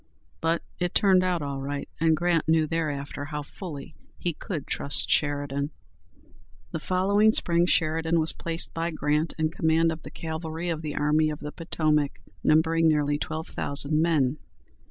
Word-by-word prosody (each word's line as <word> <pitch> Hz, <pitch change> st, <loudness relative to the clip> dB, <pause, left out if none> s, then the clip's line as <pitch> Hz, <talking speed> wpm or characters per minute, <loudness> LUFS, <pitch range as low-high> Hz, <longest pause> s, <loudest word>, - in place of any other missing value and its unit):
But 165 Hz, +1 st, +1 dB, 0.2 s
it 175 Hz, 0 st, -1 dB
turned 190 Hz, -2 st, +5 dB
out 180 Hz, -4 st, 0 dB
all 140 Hz, -1 st, -4 dB
right, 140 Hz, +1 st, -4 dB
and 160 Hz, 0 st, +3 dB
Grant 170 Hz, -1 st, +1 dB
knew 160 Hz, 0 st, +4 dB
thereafter 145 Hz, -3 st, -3 dB
how 150 Hz, 0 st, -5 dB
fully 145 Hz, -2 st, -8 dB, 0.2 s
he 175 Hz, -, -2 dB
could 155 Hz, -2 st, -5 dB
trust 140 Hz, -, +1 dB
Sheridan. 145 Hz, -1 st, 0 dB, 1.0 s
The 165 Hz, -, -3 dB
following 200 Hz, +5 st, +3 dB
spring 170 Hz, -3 st, +2 dB
Sheridan 165 Hz, 0 st, +2 dB
was 160 Hz, 0 st, +3 dB
placed 165 Hz, 0 st, -3 dB
by 165 Hz, +1 st, -1 dB
Grant 150 Hz, 0 st, 0 dB
in 160 Hz, -1 st, 0 dB
command 160 Hz, 0 st, +2 dB
of 160 Hz, 0 st, -6 dB
the -, -, -9 dB
cavalry 160 Hz, +1 st, -5 dB
of 160 Hz, -2 st, -2 dB
the 150 Hz, -2 st, -4 dB
Army 150 Hz, +1 st, +2 dB
of 150 Hz, -, -5 dB
the 150 Hz, 0 st, -6 dB
Potomac, 155 Hz, -4 st, 0 dB, 0.3 s
numbering 160 Hz, +1 st, +4 dB
nearly 145 Hz, -2 st, +2 dB
twelve 155 Hz, +1 st, -4 dB
thousand 145 Hz, +2 st, +1 dB
men. 155 Hz, -4 st, +2 dB
160 Hz, 160 wpm, -26 LUFS, 150-165 Hz, 1.0 s, turned